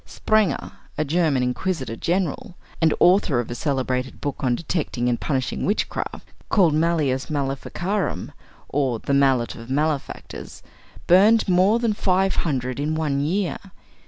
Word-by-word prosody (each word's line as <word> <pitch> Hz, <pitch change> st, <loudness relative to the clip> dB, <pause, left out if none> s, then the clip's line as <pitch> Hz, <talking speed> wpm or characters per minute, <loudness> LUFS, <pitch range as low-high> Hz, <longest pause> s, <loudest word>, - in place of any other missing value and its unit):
Sprenger, 215 Hz, -9 st, 0 dB, 0.3 s
a 155 Hz, -, 0 dB
German 150 Hz, -4 st, +1 dB
inquisitor 130 Hz, 0 st, -2 dB
general, 175 Hz, -, -2 dB, 0.3 s
and 160 Hz, -1 st, +4 dB
author 180 Hz, -8 st, +4 dB
of 120 Hz, -, -4 dB
a -, -, -1 dB
celebrated 130 Hz, -1 st, -2 dB
book 145 Hz, -, -3 dB
on 125 Hz, -2 st, +1 dB
detecting 145 Hz, -5 st, -2 dB
and 120 Hz, -1 st, 0 dB
punishing 130 Hz, -4 st, -2 dB
witchcraft, 205 Hz, -, -2 dB, 0.2 s
called 180 Hz, -7 st, +4 dB
Malleus 155 Hz, -5 st, +1 dB
Maleficarum, 145 Hz, -, -2 dB, 0.4 s
or 135 Hz, -4 st, 0 dB
"The 140 Hz, -, -3 dB
Mallet 135 Hz, -4 st, +3 dB
of 115 Hz, +1 st, -11 dB
Malefactors," 145 Hz, +1 st, -3 dB, 0.4 s
burned 210 Hz, +6 st, +5 dB
more 190 Hz, +4 st, +4 dB
than 235 Hz, -2 st, +1 dB
five 190 Hz, -1 st, +1 dB
hundred 130 Hz, -5 st, -1 dB
in 150 Hz, +2 st, -1 dB
one 150 Hz, -3 st, 0 dB
year. 175 Hz, +6 st, -1 dB
150 Hz, 135 wpm, -23 LUFS, 130-180 Hz, 0.4 s, burned